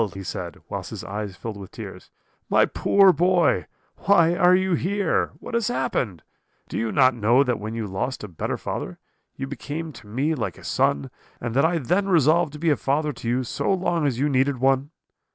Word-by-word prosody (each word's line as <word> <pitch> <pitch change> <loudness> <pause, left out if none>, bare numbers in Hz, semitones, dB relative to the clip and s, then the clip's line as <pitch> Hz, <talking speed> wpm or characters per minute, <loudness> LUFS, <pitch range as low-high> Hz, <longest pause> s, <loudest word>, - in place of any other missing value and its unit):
he 95 - -6
said, - - -5
whilst - - -5
his - - -7
eyes 100 -1 -5
filled 110 +2 -6
with 95 -2 -9
tears; - - -10 0.4
'my - - +5
poor 195 -2 +4
boy, 175 -1 +2 0.3
why 170 -4 +4
are 180 +1 +5
you 190 0 +1
here? 200 +4 0
What - - -10
has 235 -2 +1
happened? 100 - -2 0.4
Do - - -8
you 115 -1 -1
not 130 -2 +4
know 120 +4 +3
that 125 -3 -1
when 110 +2 -5
you 115 -1 -3
lost 105 +7 -3
a - - -5
better 85 -5 -3
father, - - -5 0.4
you 135 - -4
became 150 +3 -6
to 110 - -13
me 135 +9 0
like 110 - -3
a - - -14
son, 70 -1 0 0.3
and 120 -1 -4
that 140 +5 +3
I 170 +1 +2
then 180 +8 0
resolved 160 -1 +3
to - - -7
be 165 0 +2
a 145 - +2
father 150 +2 0
to 115 - -5
you 125 +2 +1
so 125 - -2
long 175 -5 +1
as 125 -4 -1
you 140 +4 +1
needed 135 0 +1
one? 135 +2 +2
140 Hz, 205 wpm, -24 LUFS, 115-170 Hz, 0.4 s, my